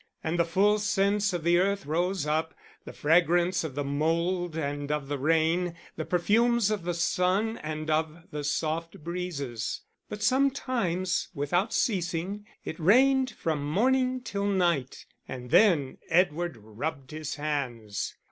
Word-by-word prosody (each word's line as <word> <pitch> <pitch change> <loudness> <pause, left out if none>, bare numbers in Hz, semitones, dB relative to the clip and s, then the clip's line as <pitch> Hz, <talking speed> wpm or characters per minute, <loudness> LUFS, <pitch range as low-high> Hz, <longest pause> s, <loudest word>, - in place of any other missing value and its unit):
And 165 +2 -1
the 170 - +4
full 200 +5 +3
scents 200 0 +1
of 175 -3 -3
the 170 +1 +4
earth 195 +1 0
rose 175 +2 0
up, 160 +2 -1 0.3
the - - -7
fragrance 175 +3 +2
of 150 -5 -5
the 145 - -1
mould 165 +4 0
and 145 -1 -3
of 150 -2 -2
the 145 -1 -2
rain, 165 +4 +1 0.2
the - - -4
perfumes 220 +5 +2
of 200 -5 -2
the 175 -1 -1
sun 185 +6 +1
and 155 0 -5
of 160 +1 -1
the 150 0 -4
soft 160 +2 -2
breezes. 150 -10 -4 0.3
But 210 0 -5
sometimes, 255 -9 +1
without 175 +9 0
ceasing, 190 0 -1 0.2
it 160 - -5
rained 260 +9 +4
from 160 -9 -2
morning 255 - +1
till 200 -4 -2
night, 175 -9 0 0.2
and 125 -1 -7
then 165 -11 +4
Edward 175 -3 +1
rubbed 130 +6 -6
his 155 0 -5
hands. 125 -9 -3
170 Hz, 145 wpm, -28 LUFS, 150-195 Hz, 0.3 s, the